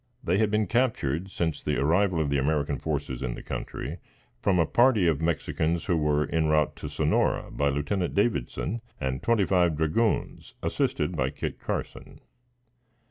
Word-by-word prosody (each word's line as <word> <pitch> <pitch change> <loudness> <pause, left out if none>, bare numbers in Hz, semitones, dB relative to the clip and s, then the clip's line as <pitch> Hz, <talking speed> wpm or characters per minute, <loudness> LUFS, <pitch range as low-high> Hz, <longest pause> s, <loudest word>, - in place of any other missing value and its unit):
They 90 +4 +1
had 110 -1 +3
been 105 0 +1
captured 95 - 0
since 80 -5 -2
the 75 - -1
arrival 85 +5 +2
of 75 -3 0
the 70 - +2
American 70 0 0
forces 65 -1 -3
in 65 -2 -2
the - - -9
country, - - -5 0.4
from 95 -2 +2
a 85 - +4
party 120 - +4
of 80 -2 +1
Mexicans, 80 +1 0
who 90 - +1
were 75 -1 +2
en 80 -1 +2
route 75 -1 +2
to - - -6
Sonora, - - +1
by 70 0 +1
Lieutenant 75 +6 -1
Davidson 100 - 0 0.2
and 65 0 -2
twenty 115 -4 +2
five 90 -5 +2
dragoons, 80 - 0
assisted - - 0
by - - +1
Kit - - -5
Carson. - - -5
80 Hz, 165 wpm, -27 LUFS, 75-100 Hz, 0.4 s, a